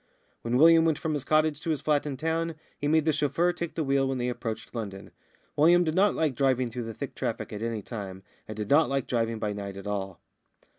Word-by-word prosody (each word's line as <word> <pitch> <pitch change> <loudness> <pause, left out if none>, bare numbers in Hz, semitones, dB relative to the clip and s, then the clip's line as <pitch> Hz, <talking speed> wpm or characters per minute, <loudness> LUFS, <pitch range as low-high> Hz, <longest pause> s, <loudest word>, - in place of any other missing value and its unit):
When 115 +1 0
William 165 +3 +7
went 160 -3 +2
from 160 -2 -2
his 145 -3 -2
cottage 155 -1 +2
to 165 - -4
his 155 -3 0
flat 150 -1 +1
in 135 -2 -4
town, 165 +1 -1 0.2
he 145 - -3
made 155 0 +3
the 155 - +3
chauffeur 170 +5 +1
take 170 -1 -5
the 160 - 0
wheel 135 -1 +2
when 135 0 -1
they 125 0 -1
approached 115 -2 -5
London. 100 -5 -6 0.4
William 170 +4 +5
did 160 -2 -1
not 195 +3 +3
like 155 -4 +1
driving 130 -2 +1
through 115 -1 -5
thick - - -6
traffic - - -4
at 105 - -5
any 115 -2 -3
time, 95 -5 -7 0.2
and 110 - -7
did 105 +2 -4
not 155 +2 +5
like 135 -2 0
driving 115 -2 -1
by 105 -1 -2
night 100 -1 -6
at 100 - -9
all. 95 -3 -4
135 Hz, 235 wpm, -27 LUFS, 110-155 Hz, 0.4 s, William